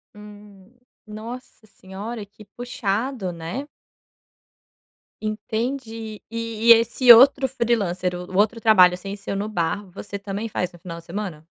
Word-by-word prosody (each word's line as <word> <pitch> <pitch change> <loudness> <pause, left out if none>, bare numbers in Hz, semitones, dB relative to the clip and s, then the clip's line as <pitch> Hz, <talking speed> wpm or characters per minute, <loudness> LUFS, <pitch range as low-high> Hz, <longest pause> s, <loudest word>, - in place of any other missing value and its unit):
Hum. 205 -1 -14 0.3
Nossa 220 +1 -10
senhora, 205 +3 -8
que 210 +1 -17
puxado, 225 -1 -3
né? 170 - -6 1.5
Entendi. 220 +1 -4
E 230 0 -4
e - - +10
esse 235 +2 +5
outro 265 +3 +6
freelancer, 200 -8 -1
o 180 0 -6
o - - -1
outro 220 +3 +2
trabalho 185 -5 +5
sem 195 +2 -7
ser 200 -1 -6
no 205 +2 -2
bar, 200 +1 -2
você 200 +1 -7
também 200 +3 -5
faz 180 -3 -2
no 175 - -15
final 170 -2 -8
de 165 - -17
semana? 175 -4 -6
210 Hz, 140 wpm, -23 LUFS, 190-230 Hz, 1.5 s, e